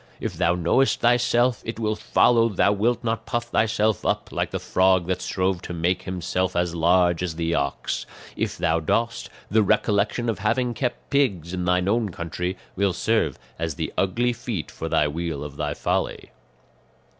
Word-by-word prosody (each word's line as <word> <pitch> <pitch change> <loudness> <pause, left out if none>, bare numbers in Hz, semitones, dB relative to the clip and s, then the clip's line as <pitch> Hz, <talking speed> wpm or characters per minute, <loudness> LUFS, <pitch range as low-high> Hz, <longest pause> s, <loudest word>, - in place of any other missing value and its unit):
If - - -3
thou 90 - +1
knowest 90 +10 +2
thyself, 120 0 +3
it 115 0 -5
will 110 -1 0
follow 115 +1 +3
thou 100 0 +3
wilt 115 +4 +1
not 115 -1 -2
puff 120 -1 -2
thyself 110 -2 +1
up - - -1
like - - -1
the - - -3
frog 95 -1 +2
that 90 +1 -2
strove 95 -1 -1
to - - -6
make 85 +2 0
himself 90 0 -2
as 85 -1 0
large 85 +1 +3
as 90 -3 -2
the 85 0 -1
ox; 70 -2 -2 0.3
if - - -2
thou 85 -1 +1
dost, 115 +8 -1 0.2
the 110 +1 +4
recollection 105 +3 +1
of 115 -4 -1
having 120 +4 0
kept 125 +1 -4
pigs 100 - +1
in 90 -1 -2
thine 90 +1 +2
own 110 +1 +1
country 90 +2 -4 0.2
will 100 -1 +1
serve 110 - 0 0.2
as 80 -3 -2
the - - -4
ugly 120 +6 +1
feet 115 - -5
for 80 - -5
the 80 -2 +3
wheel 80 -1 -3
of 75 -1 -8
thy 75 -1 -2
folly." - - -2
95 Hz, 180 wpm, -24 LUFS, 85-115 Hz, 0.3 s, the